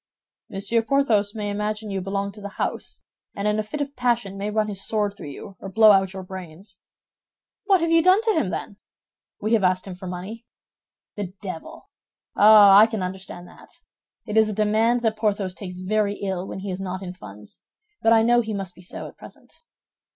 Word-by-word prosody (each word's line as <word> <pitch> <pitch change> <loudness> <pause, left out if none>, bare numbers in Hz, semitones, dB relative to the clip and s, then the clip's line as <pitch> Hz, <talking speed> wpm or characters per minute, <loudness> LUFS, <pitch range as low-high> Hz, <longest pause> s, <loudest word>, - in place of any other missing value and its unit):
"Monsieur 200 +4 0
Porthos 225 -5 +1
may 205 -1 -3
imagine 210 +1 -3
you 195 -1 -2
belong 195 +1 -3
to 210 +1 -14
the 200 0 -8
house, - - -4 0.3
and 200 +1 -2
in 210 0 +1
a - - 0
fit 290 +8 -5
of 285 0 -4
passion 235 -5 0
might 205 +2 -4
run 215 -1 +2
his 200 -2 -5
sword 210 -2 0
through 200 - -9
you 190 +7 -10
or 195 - -7
blow 215 +2 +6
out 195 -1 +3
your 190 -1 -6
brains." 185 +1 -10 0.9
"What 390 -3 +4
have 335 0 0
you 330 0 +5
done 370 +4 +5
to 445 -1 +2
him, 315 - 0
then?" 200 - -5 0.6
"We 215 +2 0
have 220 -3 +3
asked 185 0 +2
him 190 - -7
for 185 +1 -9
money." 190 +6 -7 0.7
"The 195 -3 -5
devil! 185 -5 -8 0.4
Ah, 205 -1 +8
I 215 - +7
can 220 -4 -3
understand 185 -1 -7
that. - - -17 0.6
It 215 -1 -3
is 220 -1 +5
a - - -2
demand 220 +3 +2
that 220 -1 0
Porthos 205 -3 -1
takes 180 -2 -8
very 205 +2 0
ill 190 -2 -4
when 190 - -7
he 195 0 -4
is 185 +1 -5
not 185 0 -5
in 180 -1 -6
funds; 105 - -13 0.4
but 225 - +3
I 225 -1 +6
know 240 +1 +4
he 220 -2 -4
must 195 -3 -5
be 180 - -16
so 180 - -8
at - - -15
present." - - -15
205 Hz, 210 wpm, -23 LUFS, 190-220 Hz, 0.9 s, Ah